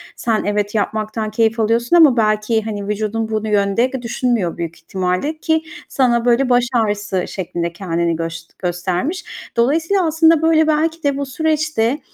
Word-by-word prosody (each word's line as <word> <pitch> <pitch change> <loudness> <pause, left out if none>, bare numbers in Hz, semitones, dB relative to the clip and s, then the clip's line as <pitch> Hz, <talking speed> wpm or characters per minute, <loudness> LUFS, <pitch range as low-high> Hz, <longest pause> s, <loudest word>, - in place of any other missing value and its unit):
Sen, 225 -2 -1
evet, 205 +1 -1
yapmaktan 215 +1 -2
keyif 225 +1 +1
alıyorsun 230 +6 +2
ama 305 -7 +6
belki, 215 0 +1
hani, 205 -2 -5
vücudun 215 +1 -2
bu 220 0 -2
yönde 210 +4 +1
düşünmüyor 235 -6 -1
büyük 170 -1 -4
ihtimalle 185 - -2
ki 320 0 0 0.3
sana 240 -3 +1
böyle 245 +2 +3
baş 245 0 +4
ağrısı 205 -5 0
şeklinde 170 -2 -4
kendini 170 -2 -1
göst 165 0 -6
göstermiş. 185 - -2 0.3
Dolayısıyla 320 +10 +2
aslında, 320 0 +4
böyle, 320 -1 +3
belki 320 +2 0
de 280 -1 +1
bu 280 - -2
süreçte, 305 -3 0
225 Hz, 150 wpm, -18 LUFS, 200-280 Hz, 0.3 s, ama